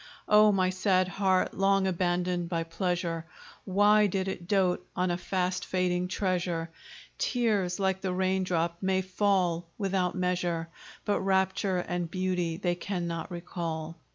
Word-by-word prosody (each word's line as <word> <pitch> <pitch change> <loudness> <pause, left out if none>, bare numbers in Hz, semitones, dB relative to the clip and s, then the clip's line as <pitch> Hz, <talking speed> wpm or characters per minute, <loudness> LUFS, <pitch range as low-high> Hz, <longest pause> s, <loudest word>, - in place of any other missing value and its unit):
Oh! 210 0 +6
my 185 -2 +2
sad 185 0 +2
heart! 190 0 +1
long 195 0 +2
abandoned 180 -1 0
by 165 -2 -1
pleasure, 165 -1 -2 0.4
Why 205 +2 +4
did 190 0 -1
it 175 -2 -5
dote 190 -3 +2
on 180 -1 +1
a - - +1
fast 185 0 -1
fading 180 -1 0
treasure? 180 -3 -1 0.5
Tears, 210 -8 +1
like 190 -1 0
the 190 - -1
raindrop, 185 -2 0
may 190 -1 +1
fall 185 -3 +1
without 190 -3 0
measure, 175 -2 -1 0.4
But 205 - +1
rapture 190 0 +1
and 175 -1 -2
beauty 180 -2 -1
they 175 0 0
cannot 175 -2 -4
recall. 165 -2 -5
185 Hz, 135 wpm, -29 LUFS, 175-190 Hz, 0.5 s, Oh